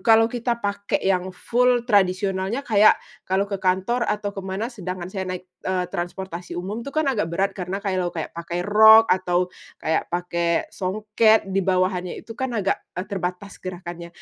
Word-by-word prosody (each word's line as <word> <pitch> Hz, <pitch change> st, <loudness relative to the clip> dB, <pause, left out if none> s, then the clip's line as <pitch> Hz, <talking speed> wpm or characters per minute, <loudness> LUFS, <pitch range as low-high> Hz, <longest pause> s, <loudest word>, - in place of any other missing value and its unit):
kalau 225 Hz, -1 st, +6 dB
kita 235 Hz, -2 st, -2 dB
pakai 200 Hz, 0 st, -1 dB
yang 185 Hz, -1 st, +1 dB
full 245 Hz, +5 st, +1 dB
tradisionalnya 195 Hz, +2 st, +1 dB
kayak 215 Hz, -2 st, +6 dB, 0.3 s
kalau 190 Hz, +1 st, +2 dB
ke 200 Hz, -1 st, -5 dB
kantor 190 Hz, +6 st, +1 dB
atau 205 Hz, -1 st, -1 dB
ke 195 Hz, -, -6 dB
mana. 195 Hz, +6 st, -4 dB
Sedangkan 185 Hz, -3 st, -6 dB
saya 190 Hz, -2 st, -3 dB
naik, 185 Hz, 0 st, -5 dB, 0.2 s
eee, 185 Hz, -1 st, -1 dB
transportasi 175 Hz, 0 st, -5 dB
umum 195 Hz, +6 st, -4 dB
itu 255 Hz, -, -7 dB
kan 310 Hz, +3 st, 0 dB
agak 225 Hz, -, 0 dB
berat 195 Hz, +4 st, 0 dB
karena 190 Hz, +2 st, -5 dB
kayak 190 Hz, -2 st, 0 dB
lo 175 Hz, -, 0 dB
kayak 165 Hz, -2 st, -5 dB
pakai 170 Hz, +1 st, -4 dB
rok 220 Hz, +2 st, +8 dB
atau 180 Hz, -1 st, 0 dB, 0.2 s
kayak 160 Hz, -, -1 dB
pakai 170 Hz, -1 st, 0 dB
songket 215 Hz, +3 st, +2 dB
di 195 Hz, -, +2 dB
bawahanya 185 Hz, -1 st, 0 dB
itu 225 Hz, -, -9 dB
kan 245 Hz, +1 st, -3 dB
agak, 200 Hz, -2 st, 0 dB, 0.2 s
eee, 180 Hz, -, -2 dB
terbatas 190 Hz, 0 st, -5 dB
gerakannya. 175 Hz, -2 st, -7 dB
190 Hz, 175 wpm, -23 LUFS, 180-215 Hz, 0.3 s, rok